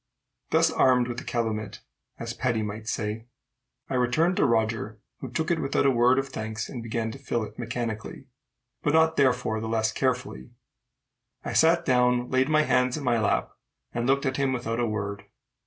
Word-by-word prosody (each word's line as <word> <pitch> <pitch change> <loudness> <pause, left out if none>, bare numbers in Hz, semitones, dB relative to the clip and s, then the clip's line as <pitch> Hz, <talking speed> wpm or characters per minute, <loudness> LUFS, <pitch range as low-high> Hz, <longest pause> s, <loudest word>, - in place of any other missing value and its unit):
Thus - - +3
armed 125 -2 +3
with 120 0 -4
the - - -9
calumet, 110 -3 -3 0.4
as 115 0 -5
Paddy 120 -4 -1
might 105 +1 -6
say, 110 +1 -3 0.6
I - - -5
returned 130 +8 +2
to - - +4
Roger, 110 -2 0 0.2
who 130 - -6
took 160 +8 -1
it 170 - +1
without 135 0 +1
a 135 - +5
word 125 +1 +4
of 135 0 -1
thanks, 110 -3 -5
and 125 - -6
began 115 0 -3
to 135 - -10
fill 120 -4 -2
it 105 - -9
mechanically, 115 -2 -4 0.6
but 145 - +1
not 160 0 +4
therefore 125 -5 +1
the 110 - -4
less 110 -1 +1
carefully. 110 - -2 1.0
I - - -3
sat 170 +1 +4
down, 125 -1 +2
laid 130 +2 +2
my 155 0 +4
hands 125 -2 +2
in 150 - -6
my 120 -3 +2
lap, 110 - 0 0.4
and 120 +1 -1
looked 140 +2 +2
at 130 0 -1
him 135 -1 +1
without 120 -2 -2
a 120 - +1
word. 100 -2 -4
120 Hz, 190 wpm, -26 LUFS, 110-130 Hz, 1.0 s, a